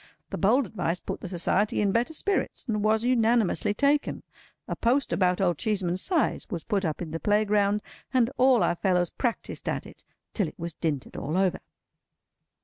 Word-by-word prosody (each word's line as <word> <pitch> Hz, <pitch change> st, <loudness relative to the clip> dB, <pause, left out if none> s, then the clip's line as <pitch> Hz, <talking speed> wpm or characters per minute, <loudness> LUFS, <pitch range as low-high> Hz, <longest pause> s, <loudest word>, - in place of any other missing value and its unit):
The -, -, -3 dB
bold 240 Hz, +7 st, +3 dB
advice 180 Hz, -5 st, -2 dB
put -, -, -6 dB
the 185 Hz, -, -6 dB
Society 190 Hz, +3 st, 0 dB
in 205 Hz, -2 st, +2 dB
better 235 Hz, +8 st, +1 dB
spirits, 400 Hz, +4 st, -1 dB
and 210 Hz, -3 st, -1 dB
was 215 Hz, +1 st, +2 dB
unanimously 230 Hz, -4 st, +2 dB
taken. 285 Hz, +3 st, +1 dB, 0.4 s
A -, -, -3 dB
post 255 Hz, +4 st, +1 dB
about 180 Hz, -2 st, +2 dB
Old 175 Hz, -5 st, +1 dB
Cheeseman's 185 Hz, -4 st, 0 dB
size 345 Hz, -6 st, 0 dB
was 170 Hz, -7 st, -4 dB
put 205 Hz, -3 st, -1 dB
up 160 Hz, 0 st, -2 dB
in 160 Hz, -, -7 dB
the 165 Hz, -, -3 dB
playground, 210 Hz, 0 st, +2 dB, 0.3 s
and 255 Hz, -2 st, +2 dB
all 255 Hz, -3 st, +4 dB
our -, -, +2 dB
fellows 180 Hz, -2 st, +1 dB
practised 240 Hz, -4 st, -3 dB
at -, -, -3 dB
it -, -, -14 dB, 0.3 s
till 200 Hz, -6 st, 0 dB
it -, -, -10 dB
was 170 Hz, -1 st, -5 dB
dinted 150 Hz, -5 st, -3 dB
all 155 Hz, +6 st, -2 dB
over. 190 Hz, -2 st, +1 dB
205 Hz, 180 wpm, -27 LUFS, 180-235 Hz, 0.4 s, all